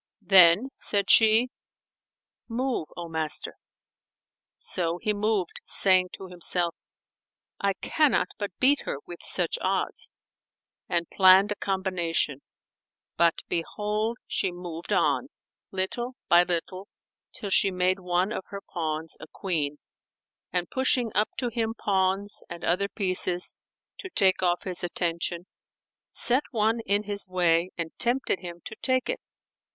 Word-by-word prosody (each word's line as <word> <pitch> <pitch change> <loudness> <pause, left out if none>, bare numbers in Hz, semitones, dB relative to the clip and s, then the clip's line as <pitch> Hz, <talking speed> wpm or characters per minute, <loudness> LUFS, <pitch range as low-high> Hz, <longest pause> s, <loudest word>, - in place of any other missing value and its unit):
[FN#449] 185 - -30
Then 190 +6 +7
said 200 -1 +1
she, 225 +2 +5 1.0
"Move, 245 -7 -2
O 170 -1 -5
master." 160 -2 0 1.0
So 170 -1 -2
he 210 +4 -1
moved, 205 -3 -1
saying 185 -2 +3
to 195 - -8
himself, 175 -1 +1 0.9
"I 200 0 +1
cannot 300 +8 +1
but 205 -1 -2
beat 280 +3 +4
her, - - -3
with 175 - -9
such 175 -3 0
odds," 190 0 -2 0.8
and 170 -1 0
planned 190 +2 +6
a - - 0
combination; 180 -8 -1 0.7
but, 170 -1 +2
behold, 210 +6 -2
she 190 - -1
moved 175 -1 -8
on, - - +2 0.4
little 240 +7 -3
by 175 0 +7
little, 185 +3 -3 0.4
till 200 - -6
she 195 - +5
made 185 +1 0
one 180 +2 0
of 190 - -4
her 200 0 -7
pawns[FN#450] 160 -1 -3
a - - -10
queen 150 -6 -2 0.7
and 175 -1 -1
pushing 255 -3 +1
up 210 - +2
to 245 - -1
him 225 -1 -2
pawns 195 0 0
and 170 0 -8
other 195 +4 +1
pieces, 185 -3 0 0.5
to 375 - -7
take 190 - +3
off 175 -1 +1
his 185 -1 -3
attention, 170 0 -2 0.6
set 250 +3 +4
one 225 -1 +1
in 205 +2 +2
his 205 -1 -3
way 175 -1 +2
and 165 -2 -4
tempted 240 -4 +1
him 175 -1 -9
to 220 - -7
take 255 -1 +1
it. - - -2
190 Hz, 135 wpm, -26 LUFS, 175-210 Hz, 1.0 s, Then